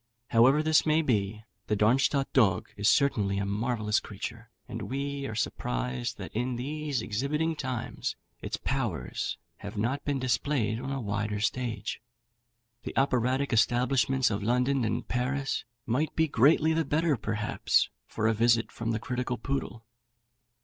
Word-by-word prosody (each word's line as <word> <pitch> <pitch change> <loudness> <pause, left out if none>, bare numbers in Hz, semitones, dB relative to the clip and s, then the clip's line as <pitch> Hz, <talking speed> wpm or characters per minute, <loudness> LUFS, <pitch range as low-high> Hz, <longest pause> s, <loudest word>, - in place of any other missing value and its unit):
However 130 +6 +5
this 155 0 +4
may 155 +1 +3
be, 110 -4 0 0.2
the 105 - +1
Darmstadt 135 +6 +2
dog 100 -9 +3
is 100 +1 +2
certainly 105 -8 +2
a 100 - 0
marvellous 105 +1 0
creature, 110 +2 -7 0.2
and 110 -3 -6
we 140 +1 -3
are 110 - -5
surprised 60 - -2
that, - - -7
in 125 +2 -1
these 145 0 -3
exhibiting 150 +9 -1
times, 130 -5 -3 0.3
its - - -3
powers 110 - -2 0.2
have 105 +1 -8
not 125 +7 -1
been 145 -1 0
displayed 120 -2 0
on 130 +2 -5
a 135 - -2
wider 105 -1 -2
stage. 110 -2 -2 0.8
The - - -7
operatic 130 0 +2
establishments 125 +2 +3
of 100 - -1
London 125 +4 +2
and 110 - -2
Paris 135 +2 -1 0.2
might 130 +7 0
be 160 0 +3
greatly 150 +4 +4
the 165 0 +2
better, 160 0 +1
perhaps, 105 -2 0 0.2
for 110 - -3
a 115 - +3
visit 115 +1 +3
from 115 -1 -4
the 110 - -1
critical 125 +1 -2
Poodle. 120 -2 -4
120 Hz, 150 wpm, -29 LUFS, 110-140 Hz, 0.8 s, However